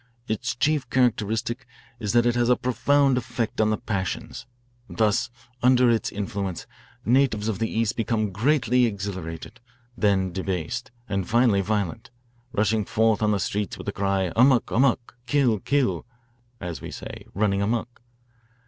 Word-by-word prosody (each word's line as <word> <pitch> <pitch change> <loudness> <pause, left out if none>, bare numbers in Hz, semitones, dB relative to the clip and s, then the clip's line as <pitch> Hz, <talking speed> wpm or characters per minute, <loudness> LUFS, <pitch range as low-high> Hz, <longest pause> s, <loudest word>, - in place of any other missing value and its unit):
Its 110 +2 -2
chief 145 0 +1
characteristic 120 0 0 0.3
is 105 -3 -2
that 120 0 +4
it 120 - +3
has 120 0 +1
a 125 - +6
profound 135 +1 +2
effect 115 -2 -2
on 110 - +3
the 110 - +1
passions. 100 -3 -4 0.4
Thus, 115 +3 +1 0.3
under 125 -1 +5
its 115 -2 0
influence, 100 -3 -4 0.4
natives 120 -3 +2
of 110 -3 -2
the 115 - 0
East 115 -1 0
become 110 -2 0
greatly 125 +2 +2
exhilarated, 95 0 -6 0.4
then 100 -4 +1
debased, 95 +6 -3 0.2
and 100 -3 -2
finally 115 -4 +4
violent, 105 +3 -2 0.4
rushing 110 0 +1
forth 110 +2 +2
on 105 - +2
the 105 -1 +1
streets 100 +1 -2
with - - -9
the - - -1
cry, 95 -2 0
'Amok, 125 +1 +4
amok,' 125 -1 +1
' - - -41
Kill, 125 -5 +2
kill 140 +2 0 0.3
' 120 0 -39
as 80 -6 -6
we - - -7
say, - - -8
'running 100 -1 +1
amuck.' 115 +3 -2
115 Hz, 155 wpm, -25 LUFS, 100-125 Hz, 0.4 s, a